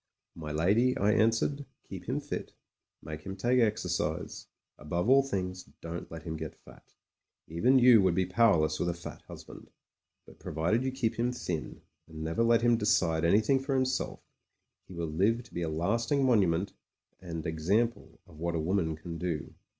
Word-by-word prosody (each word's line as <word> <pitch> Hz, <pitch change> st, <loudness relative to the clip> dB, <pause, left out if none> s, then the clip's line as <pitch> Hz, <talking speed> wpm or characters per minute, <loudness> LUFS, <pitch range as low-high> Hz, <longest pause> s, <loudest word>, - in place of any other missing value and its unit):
"My 75 Hz, -2 st, -7 dB
lady," 105 Hz, +11 st, +2 dB
I 100 Hz, +2 st, +3 dB
answered, 115 Hz, +6 st, +2 dB, 0.2 s
"keep -, -, -8 dB
him -, -, 0 dB
fit; -, -, -6 dB, 0.5 s
make 75 Hz, 0 st, -7 dB
him 95 Hz, +4 st, -6 dB
take 120 Hz, +5 st, +2 dB
exercise: 90 Hz, -8 st, -1 dB, 0.3 s
above 85 Hz, +6 st, -2 dB
all 135 Hz, +2 st, +6 dB
things 95 Hz, -8 st, -4 dB
don't 85 Hz, +1 st, -7 dB
let 80 Hz, -1 st, -8 dB
him 80 Hz, -2 st, -5 dB
get -, -, -6 dB
fat. -, -, -19 dB, 0.5 s
Even 120 Hz, +12 st, +3 dB
you 125 Hz, -4 st, +7 dB
would 95 Hz, -3 st, +2 dB
be 95 Hz, 0 st, +2 dB
powerless 90 Hz, -5 st, +3 dB
with 85 Hz, -, 0 dB
a 85 Hz, -, -2 dB
fat 85 Hz, -, -9 dB
husband. -, -, -11 dB, 0.6 s
But -, -, -17 dB
provided 85 Hz, +10 st, 0 dB
you 130 Hz, -, -1 dB
keep 125 Hz, -4 st, -2 dB
him 120 Hz, +1 st, +1 dB
thin, 90 Hz, -10 st, -5 dB, 0.3 s
and 80 Hz, -1 st, -8 dB
never 80 Hz, +7 st, -1 dB
let 115 Hz, 0 st, +4 dB
him 120 Hz, -1 st, +4 dB
decide 85 Hz, -6 st, +2 dB
an3rthing 110 Hz, +10 st, +3 dB
for 135 Hz, 0 st, -1 dB
himself, 130 Hz, 0 st, -1 dB, 0.7 s
he 95 Hz, -, -11 dB
will 85 Hz, 0 st, -2 dB
live 100 Hz, +10 st, +1 dB
to 120 Hz, -, -20 dB
be 85 Hz, -, -3 dB
a 80 Hz, -, -1 dB
last 100 Hz, +9 st, -1 dB
ing 140 Hz, -2 st, +3 dB
monument 95 Hz, -6 st, +2 dB, 0.5 s
and 80 Hz, -3 st, -6 dB
example 80 Hz, +1 st, -1 dB
of 80 Hz, -2 st, -16 dB
what 85 Hz, +1 st, -2 dB
a -, -, 0 dB
woman 80 Hz, -1 st, 0 dB
can 85 Hz, +1 st, -8 dB
do. 85 Hz, -4 st, -3 dB
95 Hz, 180 wpm, -30 LUFS, 80-115 Hz, 0.7 s, you